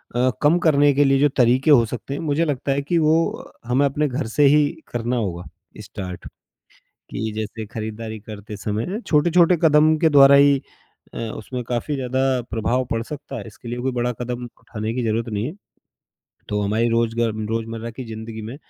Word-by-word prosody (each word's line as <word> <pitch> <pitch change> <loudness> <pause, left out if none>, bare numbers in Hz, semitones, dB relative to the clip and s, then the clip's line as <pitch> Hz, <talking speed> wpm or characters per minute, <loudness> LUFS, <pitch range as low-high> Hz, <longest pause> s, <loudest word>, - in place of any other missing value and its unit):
अ, 125 +1 +3
कम 150 +4 +4
करने 145 -2 +5
के 145 +1 +4
लिए 135 0 +3
जो 145 - +5
तरीके 130 +5 +4
हो 120 -5 +6
सकते 125 +4 -6
हैं, - - -4
मुझे 160 +1 0
लगता 140 -2 -2
है 140 +1 0
कि 170 +5 -1
वो 155 -1 +3 0.2
अ, - - -10 0.2
हमें 135 +3 +3
अपने 145 +2 0
घर 130 -1 -3
से 145 +6 +2
ही 150 -1 +5 0.2
करना 120 +1 -2
होगा 90 -6 -3 0.4
स्टार्ट 100 -4 -8 0.9
कि 110 +1 -3
जैसे 110 +1 -4
खरीदारी 110 0 -6
करते 105 0 -9
समय 110 - -3
छोटे-छोटे 170 +3 +4
कदम 155 0 +5
के 165 0 +4
द्वारा 140 -1 +7
ही 140 0 +6 0.6
अ, - - -6
उसमें 115 +2 -5
काफ़ी 125 +5 -2
ज़्यादा 130 -1 -2 0.3
प्रभाव 120 +3 0
पड़ 115 0 -1
सकता 145 +1 -8
है 105 - -7
इसके 115 +2 -12
लिए 120 +1 -4
कोई 130 +1 -1
बड़ा 125 0 -1
कदम 125 0 -4 0.2
उठाने 110 +1 -5
की 125 - -2
जरूरत 115 +1 -1
नहीं 105 +2 -2
है। 155 - -6 1.0
तो 105 0 -1
हमारी 110 +4 +1
रोज 115 0 +1
ग 115 -2 +1 0.2
रोजमर्रा 115 0 -3
की 130 +3 -8
जिंदगी 110 0 -7
में 115 +5 -7
125 Hz, 195 wpm, -22 LUFS, 110-145 Hz, 1.0 s, द्वारा